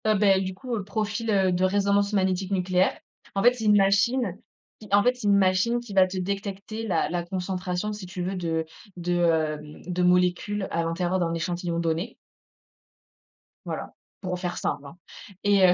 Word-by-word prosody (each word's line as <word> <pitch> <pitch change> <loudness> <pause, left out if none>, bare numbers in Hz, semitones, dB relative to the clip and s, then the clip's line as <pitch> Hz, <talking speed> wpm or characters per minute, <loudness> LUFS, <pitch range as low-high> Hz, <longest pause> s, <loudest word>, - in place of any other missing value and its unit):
Heu, 215 0 +4
ben, 195 -1 +4
du 185 0 -4
coup, 245 +4 -4
heu, 205 - -3
profil, 215 +3 -2
heu, 190 -2 +3
de 180 +1 0
résonance 200 +1 +2
magnétique 190 -1 0
nucléaire, 185 -1 +1 0.4
en 195 - +1
fait, 245 +1 +7
c'est 235 -3 -5
une 210 -1 +6
machine, 200 +1 +2 0.4
qui, 215 - -12
en 205 0 +5
fait, 250 - +4
c'est 245 -4 -4
une 200 0 +5
machine 195 +5 +2
qui 240 -4 -9
va 190 -1 +5
te 185 +1 -6
détecter 200 +3 -4
la 170 -5 +1
la 175 +1 -2
concentration 180 +2 -3
si 205 -2 -7
tu 180 0 -5
veux 190 +2 -2
de 165 -3 -1 0.3
de, 175 0 -1
hem, 155 -2 0
de 180 0 -1
molécules 180 +3 +2
à 170 - 0
l'intérieur 175 +2 -1
d'un 170 -2 0
échantillon 170 0 -2
donné. 170 +6 -1 1.5
Voilà, - - -5 0.3
pour 180 -2 -3
faire 180 -1 -3
simple, 140 - -2
hein 140 +5 -11 0.5
et 200 -2 +5
heu 180 - +6
190 Hz, 185 wpm, -26 LUFS, 180-205 Hz, 1.5 s, fait